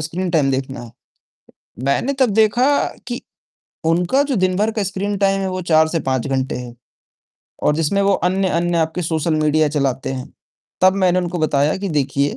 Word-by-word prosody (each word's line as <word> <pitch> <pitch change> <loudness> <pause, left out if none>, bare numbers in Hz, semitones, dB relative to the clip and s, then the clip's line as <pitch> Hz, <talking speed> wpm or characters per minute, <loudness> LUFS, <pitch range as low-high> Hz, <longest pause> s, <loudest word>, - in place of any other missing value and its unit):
Screen time 165 -2 0
देखना 135 +1 -3
है।" 120 - -11 1.0
मैंने 140 - +1
तब 260 -3 +4
देखा 230 +4 +3 0.4
कि 245 +1 -4 0.7
उनका 180 +11 +2
जो 280 -2 -2
दिन 185 -2 +1
भर 215 +2 +1
का 215 -2 -2
स्क्रीनटाइम 195 0 0
है, 190 - -1
वो 185 0 -3
4 160 -2 +3
से 165 +1 -1
5 130 0 -1
घंटे 130 -1 -1
है, 125 -1 -7 0.9
और 150 - +3
जिसमें 165 +6 +1
वो 200 - +3 0.2
अन्य-अन्य 175 -2 0
आपके 160 +2 -1
सोशल 160 0 -1
मीडिया 155 0 +2
चलाते 135 -3 -1
हैं, 130 -1 -6 0.5
तब 185 0 +5
मैंने 180 0 +3
उनको 175 -1 -2
बताया 150 -1 +1
कि, 195 0 -4
"देखिए, 140 -2 0
170 Hz, 170 wpm, -19 LUFS, 145-195 Hz, 1.0 s, तब